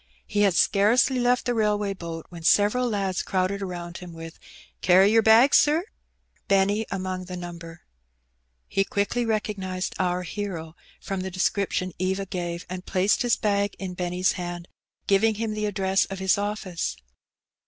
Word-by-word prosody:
He 205 - -1
had 195 -4 +3
scarcely 235 +8 +3
left 245 +1 +2
the 245 - +1
railway 210 -3 +1
boat 165 -3 -7
when 170 -2 -10
several 210 +8 +3
lads 195 -4 -1
crowded 190 +1 -1
around 175 -2 -6
him 180 -2 -10
with 165 0 -10 0.4
"Carry 190 +3 +5
yer 225 0 +5
bag, 225 +5 +6
sir?'* 310 +4 +4 0.6
Benny 200 +2 +2
among 185 -1 -4
the 180 0 -7
number. 170 -1 -9 0.9
He 195 - +1
quickly 205 +4 -1
recognized 190 -4 -2
our 180 0 0
hero 170 -4 -5 0.2
from 195 -1 -4
the 190 - -4
description 185 0 -1
Eva 190 +2 -1
gave, 175 -2 -4
and 180 0 -6
placed 190 +3 +1
his 245 -2 +3
bag 200 -1 0
in 185 -2 -6
Benny^s 180 +1 0
hand, 175 -1 -6 0.4
giving 215 +3 +3
him 220 0 -2
the 215 0 -2
address 195 -1 +1
of 195 - -7
his 190 0 +2
office. 200 - -3
195 Hz, 155 wpm, -25 LUFS, 180-210 Hz, 0.9 s, bag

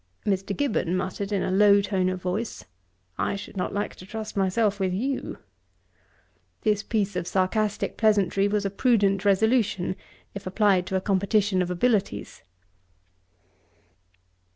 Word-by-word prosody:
Mr. 195 0 -1
Gibbon 215 -10 0
muttered, 195 +2 -3
in 195 -2 0
a - - -1
low 200 +1 +6
tone 190 -2 0
of 185 0 -3
voice. 185 +6 -4 0.5
'I - - 0
should 200 - -8
not 180 - -2
like 205 +1 -2
to - - -11
trust 215 +3 -7
myself 200 +2 +1
with 190 -1 0
you.' 260 +8 -3 1.2
This 210 -1 +1
piece 205 -3 -1
of 180 -1 -2
sarcastick 200 +3 0
pleasantry 200 -3 +3
was 205 0 0
a 195 - -1
prudent 200 -3 +2
resolution, 205 -2 +2 0.4
if 200 -1 -7
applied 190 -2 +2
to 190 - -2
a 190 - +1
competition 200 0 +1
of 180 - -1
abilities. 185 - -1
200 Hz, 140 wpm, -25 LUFS, 185-210 Hz, 1.2 s, low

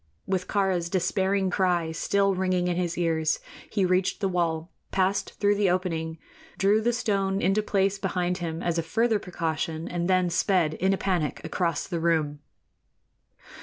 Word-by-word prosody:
With 185 -1 -1
Kāra's 190 -4 0
despairing 190 +1 +1
cry 175 -3 +1
still 195 +4 +1
ringing 185 -1 0
in 175 - 0
his 175 -1 -2
ears, 160 -2 +1 0.3
he 200 -3 +1
reached 185 +1 +1
the 195 - +1
wall, 170 -2 -1 0.2
passed 195 +1 0
through 205 0 +4
the 205 -2 +2
opening, 165 -3 -1 0.4
drew 205 +3 +3
the 240 +2 +2
stone 200 -5 0
into 195 +2 +2
place 195 -1 +1
behind 180 -1 -1
him 165 -1 -4
as 170 -1 0
a - - +2
further 220 +7 +1
precaution, 165 -3 -3
and 175 +1 -2
then 185 -1 +3
sped 170 -3 +2
in 190 +4 +1
a 195 - +1
panic 180 -7 -1
across 170 +1 -1
the 170 -3 -2
room. 160 -3 +1
180 Hz, 165 wpm, -26 LUFS, 170-195 Hz, 0.4 s, through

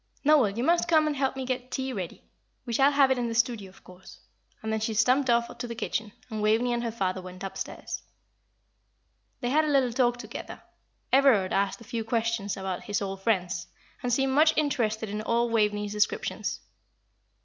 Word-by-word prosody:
"Noel, 290 -7 +5
you 235 - 0
must 340 +4 +3
come 315 -2 +4
and 305 -1 0
help 270 -1 0
me 265 -1 -4
get 255 0 -3
tea 265 0 -3
ready. 185 -6 -6 0.4
We 235 - -4
shall 275 +4 +5
have 275 -2 +4
it 260 - +2
in 240 - 0
the 230 - -3
studio, 230 -4 0
of 185 - -20
course;" 180 +1 -14 0.5
and 220 0 -2
then 220 - 0
she 220 0 -2
stumped 255 +5 +3
off 235 0 +2
to 245 - -5
the 235 - -6
kitchen, 220 -1 -3 0.2
and 220 -3 -4
Waveney 225 +3 +2
and 240 0 -1
her 230 - -2
father 190 -4 -2
went 185 +1 -10
upstairs. 195 0 -5 1.4
They 245 -1 -1
had 310 +3 +4
a - - -1
little 265 -4 +2
talk 245 -1 +2
together. 235 -2 -8 0.5
Everard 260 -9 +5
asked 200 +4 0
a - - -9
few 230 -1 -4
questions 225 -3 -1
about 190 -2 -4
his 205 -1 -1
old 195 -1 -4
friends, 180 -5 0 0.3
and 245 -1 -1
seemed 270 +2 +2
much 310 +3 +4
interested 230 -7 0
in 210 +1 -4
all 235 +1 +1
Waveney's 210 -2 +1
descriptions. 210 0 -1
230 Hz, 195 wpm, -27 LUFS, 210-260 Hz, 1.4 s, Noel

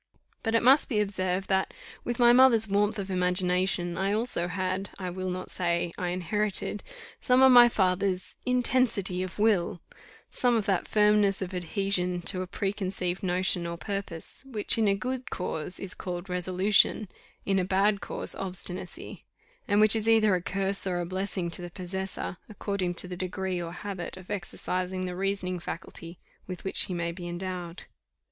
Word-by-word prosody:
But 225 -1 0
it 230 - +3
must 270 +4 +5
be 220 -5 +1
observed 190 -2 -1
that, 190 -1 0 0.3
with 240 0 -3
my 240 -1 +6
mother's 240 -3 +6
warmth 205 +2 +1
of 195 -1 -4
imagination, 180 -1 +1
I 195 +1 +1
also 215 -6 -1
had, 185 +2 -2
I 185 -2 -4
will 185 +1 -4
not 185 0 -4
say, 170 -1 0
I 180 - -3
inherited, 200 +4 -1 0.4
some 255 0 +4
of 265 - +8
my 240 -1 +9
father's 185 -2 0
"intensity 245 -7 +1
of 185 -1 -5
will," 205 -5 +2 0.5
some 245 -1 +2
of 220 -3 0
that 195 -4 0
firmness 210 -2 +3
of 185 0 -7
adhesion 180 0 0
to 185 0 0
a 185 - -4
preconceived 190 -2 -2
notion 180 -1 +1
or 170 0 -5
purpose, 195 -2 -4
which 220 -6 +3
in 225 -2 +2
a 195 - +3
good 255 +4 -4
cause 180 -1 -3
is 190 -2 -5
called 180 0 -6
resolution, 185 +4 +2 0.4
in 195 -1 +2
a - - +1
bad 195 +2 +2
cause - - -2
obstinacy; 185 -1 -6 0.4
and 205 0 +3
which 215 +1 +8
is 220 0 +1
either 220 -3 +5
a 180 - +1
curse 195 +2 0
or 180 -1 -1
a 175 - -2
blessing 185 -1 -3
to 175 - -2
the 175 - -6
possessor, 185 0 -5
according 200 -4 -3
to 180 - +3
the 180 - -5
degree 185 0 -3
or 170 -1 -5
habit 185 0 -6
of 185 -1 -11
exercising 185 -1 -3
the 180 -1 -4
reasoning 185 -1 -1
faculty 170 0 -7 0.3
with 180 -2 -7
which 190 - +1
he 185 - -5
may 170 0 -2
be 175 0 -8
endowed. 175 -1 -5
190 Hz, 175 wpm, -28 LUFS, 180-205 Hz, 0.5 s, my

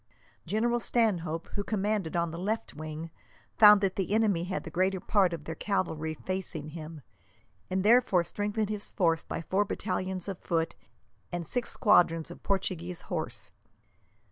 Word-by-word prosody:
General 235 +6 +1
Stanhope, 180 -10 0
who 200 - -3
commanded 205 -5 -1
on 170 -1 +1
the 165 - -6
left 215 +5 -2
wing, 155 +2 -6 0.4
found 210 -2 +8
that 195 -2 0
the 195 +2 0
enemy 205 -6 +2
had 185 +1 -3
the 165 - -8
greater 185 +3 +1
part 190 -1 +2
of 165 -3 -5
their 160 - -5
cavalry 160 -4 -2
facing 170 -4 -4
him, 155 -1 -8 0.7
and 185 0 0
therefore 215 -5 +5
strengthened 210 +3 -2
his 210 -1 -3
force 165 -4 +2
by 165 - -5
four 195 +5 +2
battalions 185 -2 -3
of 195 -3 -4
foot 165 -1 -1 0.6
and 175 -1 -3
six 245 +8 0
squadrons 170 -7 +3
of - - -11
Portuguese 180 -3 -2
horse. 115 - -3
185 Hz, 155 wpm, -29 LUFS, 165-205 Hz, 0.7 s, found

